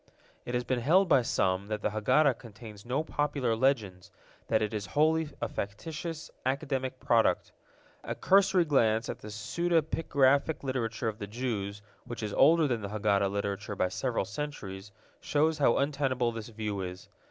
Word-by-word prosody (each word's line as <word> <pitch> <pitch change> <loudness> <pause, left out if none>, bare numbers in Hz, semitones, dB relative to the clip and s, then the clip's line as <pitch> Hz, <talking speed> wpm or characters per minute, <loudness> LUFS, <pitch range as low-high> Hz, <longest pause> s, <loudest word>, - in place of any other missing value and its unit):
It 120 - -3
has 125 - 0
been 125 0 -1
held 175 +10 +4
by 135 - +5
some 95 -4 0
that 105 0 -4
the - - +1
Haggadah 125 +5 +3
contains 110 -2 -12
no 135 +5 0
popular 145 -6 -1
legends, 105 -8 0 0.4
that 110 -1 +2
it 105 - -2
is 105 -2 -3
wholly 160 0 +3
a - - -1
factitious, 160 - -5
academic 130 -1 -2
product. 115 -2 +2 0.5
A - - -4
cursory 190 -2 +4
glance 115 -6 +2
at - - -5
the - - -10
pseudepigraphic 145 +4 +1
literature 120 -4 -2
of 110 0 -3
the 105 - -5
Jews, 105 -3 -4 0.2
which 120 -2 -6
is 105 -1 -3
older 160 +2 +5
than 120 -4 -1
the 100 - -5
Haggadah 100 -2 +1
literature 100 0 -3
by 90 - +1
several 120 +1 -1
centuries, 100 -4 -6 0.3
shows 155 +1 +1
how 135 -5 +4
untenable 135 -4 0
this 115 -1 -7
view 105 -3 -4
is. 90 0 -7
120 Hz, 165 wpm, -30 LUFS, 105-145 Hz, 0.5 s, by